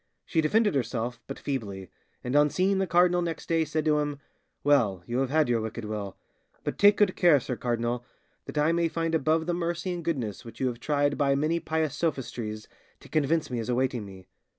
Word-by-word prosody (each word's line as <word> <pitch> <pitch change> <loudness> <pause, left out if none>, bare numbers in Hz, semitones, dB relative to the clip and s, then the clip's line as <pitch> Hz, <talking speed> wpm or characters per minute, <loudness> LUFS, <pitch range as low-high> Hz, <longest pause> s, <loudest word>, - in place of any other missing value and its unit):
She 165 - +1
defended 210 +6 +3
herself 120 -2 -2
but 135 - -6
feebly, 100 -9 -4 0.3
and 125 +2 -2
on 145 0 +5
seeing 190 +4 +1
the 190 - 0
cardinal 175 0 +4
next 165 -2 -4
day 165 -1 +2
said 155 0 -2
to 150 -1 +3
him, 145 -1 -2 0.5
'Well, 115 -11 +3
you 120 +2 -2
have 135 -1 0
had 155 +1 +3
your 120 -2 +1
wicked 110 +1 -5
will; 105 -2 -5 0.5
but - - -4
take 205 0 +6
good 205 -3 +3
care, 170 -6 +5
sir 125 0 -4
cardinal, 120 0 -1 0.4
that - - -7
I 150 +2 +3
may 170 0 +2
find 165 0 -2
above 160 +1 +2
the 175 - 0
mercy 175 +1 -2
and 175 -1 -5
goodness 125 - -2
which 115 - -11
you 130 - 0
have 120 -1 -7
tried 145 +2 0
by 140 -1 +3
many 155 +4 +1
pious 155 -3 -1
sophistries 120 -9 -3 0.3
to - - -16
convince 155 0 +1
me 120 - -1
is 115 - -4
awaiting 125 -2 0
me. 95 -2 -11
145 Hz, 210 wpm, -27 LUFS, 120-165 Hz, 0.5 s, take